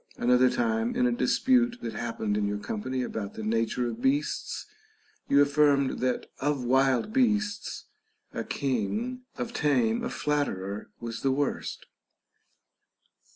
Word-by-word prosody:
Another 125 +1 +4
time, 230 - 0
in 250 0 +2
a 250 - +3
dispute 245 0 +2
that 115 - -3
happened 110 -2 -2
in 105 -1 +1
your 105 0 -1
company 125 +5 -3
about 105 -4 -5
the 110 - -5
nature 115 +3 0
of 225 - -5
beasts, 270 +2 0 0.6
you 140 - +5
affirmed 145 -1 +3
that 125 -1 0
of 145 -2 0
wild 130 - +2
beasts, 210 -5 0 0.5
a - - -3
king, 210 - -2 0.2
of 235 -1 -4
tame, 125 - +2
a - - -1
flatterer 105 -10 -2
was 115 -1 -5
the 135 - +2
worst. 140 +1 -2
135 Hz, 135 wpm, -28 LUFS, -, 0.6 s, you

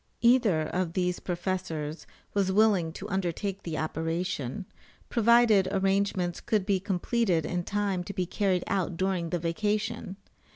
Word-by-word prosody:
Either 235 -10 +4
of 175 +1 -2
these 180 -1 0
professors 170 -4 -3 0.3
was 195 -2 +1
willing 195 -5 +3
to 190 +5 -7
undertake 195 0 -2
the 160 -3 -4
operation, 160 -3 -2 0.4
provided 230 -4 +5
arrangements 195 -2 0
could 210 -4 0
be 195 -2 +2
completed 190 -2 0
in 175 -1 -2
time 200 -2 -1
to 190 - -6
be 185 -2 -1
carried 185 -1 0
out 185 -3 -1
during 185 -2 0
the 175 - 0
vacation. 205 +4 -2
185 Hz, 135 wpm, -28 LUFS, 175-205 Hz, 0.4 s, provided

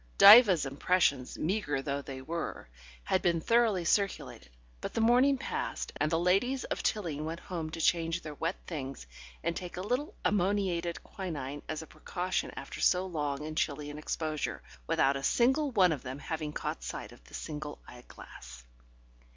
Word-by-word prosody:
Diva's 200 - +9
impressions, 140 -2 +1
meagre 155 -6 -1
though 140 0 -2
they 135 -1 -8
were, 165 +3 -4 0.4
had 185 - +1
been 170 -2 +2
thoroughly 220 -2 +2
circulated, 195 - 0 0.3
but - - -5
the - - +1
morning 250 +5 +5
passed, - - -4
and 155 - 0
the 165 - +3
ladies 195 +10 +2
of - - -3
Tilling 165 -8 -1
went 165 +2 -4
home 165 -4 -5
to 165 - -7
change 165 0 +2
their 155 - -6
wet 165 +5 -2
things 135 - -6 0.4
and 170 +1 -1
take 180 0 -6
a - - -2
little 250 +9 -2
ammoniated 185 -4 0
quinine 145 -7 -5
as 155 0 -3
a - - -10
precaution 175 +4 -3
after - - -7
so 180 +1 +3
long 150 -5 -3
and 155 0 -5
chilly 145 -1 -1
an 150 - -8
exposure, 155 0 -3 0.2
without 135 +1 +3
a - - -5
single 265 - +3
one 190 -8 +4
of 145 -5 -2
them 130 +1 -6
having 155 0 -4
caught - - -4
sight - - -6
of - - -16
the - - -11
single 150 -1 -6
eyeglass. 65 - -12
165 Hz, 170 wpm, -31 LUFS, 145-190 Hz, 0.4 s, Diva's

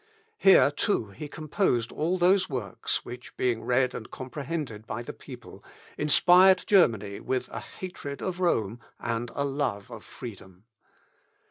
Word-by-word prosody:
Here 190 -7 +6
too, 145 - 0
he 125 +10 -7
composed 150 - -1
all 170 +5 0
those 185 +2 +3
works 120 -9 -3
which, 125 +1 -10
being 120 -3 0
read 125 +1 +2
and 110 - -7
comprehended 130 -4 -5
by 120 +2 -4
the - - -7
people, - - -12 0.3
inspired 180 +5 +5
Germany 110 - +3
with 130 -1 -2
a - - -5
hatred 145 -6 -8
of 185 -1 -4
Rome 115 - 0 0.2
and 115 +1 -2
a 140 - 0
love 135 -6 -2
of 115 -2 -9
freedom. 95 -6 -10
130 Hz, 140 wpm, -27 LUFS, 115-170 Hz, 0.3 s, Here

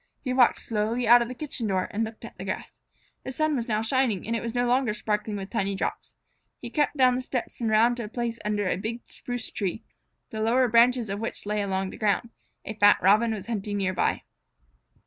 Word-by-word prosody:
He 255 - -1
walked 250 -2 +4
slowly 225 +2 -1
out 240 +1 +8
of 235 - -1
the 255 - -7
kitchen 255 -4 -4
door 185 -2 0
and 220 +2 -1
looked 220 0 -7
at - - -11
the - - -8
grass. - - -6 0.4
The - - -5
sun 310 +2 0
was 235 -3 -2
now 215 -1 0
shining, 230 -5 +1
and 230 +2 -1
it 230 - -2
was 235 0 -5
no 245 0 +2
longer 245 -3 +1
sparkling 210 0 -2
with 195 0 -7
tiny 200 -4 -1
drops. - - -4 0.4
He - - -7
crept 295 -1 0
down 255 -1 +5
the 250 - -1
steps 255 -1 -4
and 230 - +1
around 230 +3 +4
to 235 - -4
a - - -8
place 235 0 -3
under 210 -1 -1
a 180 - 0
big 225 +5 -4
spruce 245 -2 -6
tree, 200 +2 -3 0.5
the 220 - -4
lower 245 +3 +3
branches 235 +1 +4
of 200 +1 -4
which 225 -1 -5
lay 210 0 -1
along 190 -1 -2
the - - -10
ground. 220 +2 0 0.3
A 215 - -4
fat 205 -1 +5
Robin 215 +5 +5
was 205 -3 -4
hunting 205 -2 -3
near 190 -2 0
by. - - 0
225 Hz, 230 wpm, -26 LUFS, 210-245 Hz, 0.5 s, out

